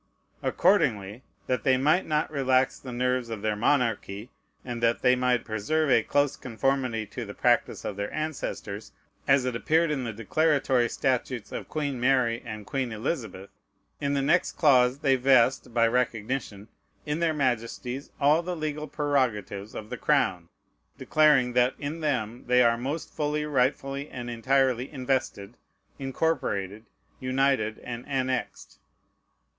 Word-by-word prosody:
Accordingly, 125 - +1 0.2
that 125 - -1
they 130 -2 +4
might 155 +8 +2
not 150 -1 0
relax 130 -2 +1
the 130 - -8
nerves 125 0 -1
of 110 -2 -6
their 110 -1 0
monarchy, 115 -3 0 0.3
and 120 -2 -5
that 115 0 +1
they 125 0 +5
might 125 -1 +1
preserve 135 +8 0
a 115 - +5
close 145 +4 +1
conformity 125 -2 -1
to - - -7
the - - -8
practice - - +1
of 100 - -4
their 100 0 -3
ancestors, 135 -9 -5 0.3
as 135 -1 +4
it 125 -2 -2
appeared 160 +6 +2
in 135 -3 -1
the 115 - -3
declaratory 130 +2 +1
statutes 130 -3 -2
of - - -6
Queen 145 -4 -2
Mary 125 -2 +2
and 105 -1 -7
Queen 130 0 -2
Elizabeth, 110 - -4 0.5
in 140 0 -1
the 140 - 0
next 175 +6 +2
clause 130 -5 +4
they 135 -2 +2
vest, 130 -1 +3
by 115 0 +3
recognition, 115 -3 -2 0.4
in 150 +2 -2
their 170 -1 +2
Majesties 125 -1 -2
all 150 +4 +4
the 180 +1 -4
legal 155 -1 -4
prerogatives 125 -9 -1
of 110 - -7
the - - -4
crown, 90 -2 +1 0.5
declaring 145 -5 +3
"that 125 +1 +3
in 145 +3 -5
them 125 -7 -2
they 125 0 +5
are 115 -1 +4
most 140 +7 -4
fully, 150 0 -1
rightfully, 135 0 -1
and 120 -1 -6
entirely 130 +1 +1
invested, 130 -6 -2 0.4
incorporated, 125 - -2 0.3
united, 130 -4 +1
and 120 0 -6
annexed." 130 -2 -3
130 Hz, 145 wpm, -27 LUFS, 115-140 Hz, 0.5 s, they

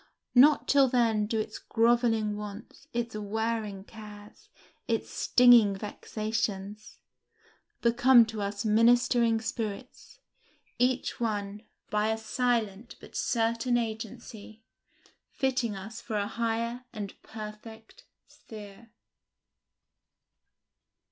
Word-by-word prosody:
Not 285 +4 +6
till 275 -1 +5
then 230 -4 +2
do 225 0 -1
its 215 - -4
grovelling 225 -2 +1
wants, 210 +6 -9
its 235 -2 -3
wearing 215 -1 -3
cares, 210 -1 -13 0.4
its 225 -2 -2
stinging 240 -5 +5
vexations, 210 0 -4 0.9
become 240 0 +6
to 220 -1 -6
us 200 +1 -3
ministering 230 +1 +4
spirits, 225 - -6 0.6
each 250 +1 0
one, 205 -3 -3 0.3
by 210 0 +1
a 220 0 0
silent 225 -1 -1
but - - -14
certain 230 +1 0
agency, 220 -1 -6 0.7
fitting 255 -5 -1
us 220 +4 -8
for 220 -3 -4
a 200 - 0
higher 230 +2 -2
and 205 -4 -6
perfect 220 - -10 0.2
sphere. 210 +1 -13
225 Hz, 95 wpm, -28 LUFS, 210-235 Hz, 0.9 s, Not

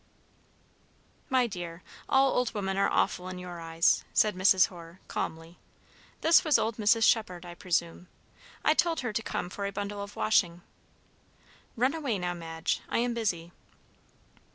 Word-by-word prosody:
"My 260 -2 +3
dear, 175 -5 -7 0.3
all 270 0 +4
old 250 -2 0
women 195 -2 -2
are 195 - +2
awful 180 - 0
in 185 - -6
your 180 -1 -8
eyes," 165 0 +2
said 215 -1 +3
Mrs. 185 0 +5
Hoare, 170 0 -12
calmly. 165 +2 -5 0.6
"This 325 +1 +5
was 310 -3 +4
old 220 0 -1
Mrs. 225 +1 +3
Shephard, 185 -7 +2
I 175 - -8
presume. 175 0 -2 0.6
I 310 - +5
told 330 -1 +1
her 245 -4 -3
to 225 - -1
come 180 - -4
for 200 +1 -3
a - - -4
bundle 205 0 -4
of 200 0 -8
washing. 175 -5 +1 1.1
Run 255 +4 +2
away 280 -10 -2
now, 180 -1 -2
Madge, 165 -1 -3
I - - 0
am 240 +1 +1
busy." 175 -7 -2
195 Hz, 155 wpm, -29 LUFS, 175-230 Hz, 1.1 s, Mrs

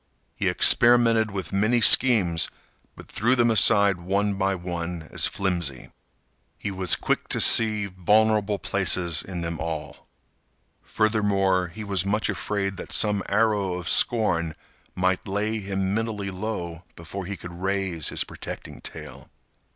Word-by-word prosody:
He - - -2
experimented 115 -2 +4
with 100 -1 -6
many 110 +5 +2
schemes, 105 -9 +5 0.5
but - - -14
threw 120 +5 0
them 120 -2 +2
aside 100 -2 +4
one 100 +3 -1
by 95 0 -1
one 85 -2 -6
as - - +2
flimsy. 85 -9 -3 0.7
He 100 - -5
was 95 -2 +3
quick - - -2
to - - -1
see 110 -2 +4
vulnerable 105 +2 +1
places 90 -4 +1
in 90 -2 -7
them 85 -1 -5
all. 80 -2 -5 0.8
Furthermore, 100 -4 0
he 105 +6 -9
was 100 -4 -2
much 105 +2 -1
afraid 100 -2 -3
that - - -9
some 105 -2 +1
arrow 100 -3 0
of 90 -2 -7
scorn 85 -9 +1 0.4
might 95 0 -1
lay 105 +3 -2
him 95 -1 -3
mentally 105 -3 -3
low 90 -4 -6
before 85 +3 -8
he 100 -1 -6
could 85 +3 -10
raise 95 -4 -2
his - - -2
protecting - - -9
tale. - - -9
100 Hz, 140 wpm, -24 LUFS, 90-105 Hz, 0.8 s, schemes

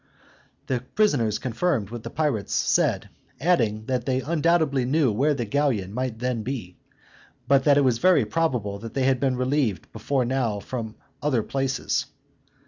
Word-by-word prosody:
The 130 - -1 0.2
prisoners 125 - +2
confirmed 125 - -1
what 120 -1 -6
the 115 - -7
pirates 145 -8 -1
said, - - +1 0.3
adding, 115 -9 +1
that 125 -1 -1
they 130 0 0
undoubtedly 160 -3 +1
knew 135 0 +2
where 145 +8 +1
the 120 -3 -2
galleon 115 -7 0
might 125 -1 -3
then 125 -1 -2
be, 110 -7 -5 0.7
but 140 -1 +4
that 145 -1 +5
it 145 - +4
was 125 -4 +2
very 180 -9 +4
probable 110 -6 -1
they 115 +5 -3
had 130 -1 +2
been 130 -1 +1
relieved 130 -5 -1
before 125 +4 -1
now 120 -5 -1
from 110 0 -6 0.3
other 130 -7 +1
places. 135 +1 -1
130 Hz, 155 wpm, -25 LUFS, 115-140 Hz, 0.7 s, that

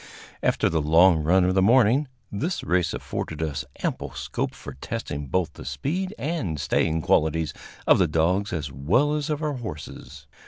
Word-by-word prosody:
After - - +2
the 80 -1 +1
long 80 +2 +5
run 90 +5 +4
of 90 +1 +2
the 95 - +3
morning, 125 +6 +4 0.2
this 155 - -2
race 90 -1 +1
afforded 80 - -5
us 75 -3 -3 0.2
ample - - -2
scope - - -3
for - - -9
testing 70 +2 -5
both 90 +4 -1
the - - -10
speed 185 +7 -2
and 125 - -2
staying 80 +3 +1
qualities 80 -1 +2 0.3
of - - +5
the - - +4
dogs 90 +6 +1
as 75 -5 -3
well 95 - +2
as 150 0 -2
of 150 0 -2
our 150 -1 0
horses. 110 - -8
90 Hz, 170 wpm, -25 LUFS, 80-130 Hz, 0.3 s, long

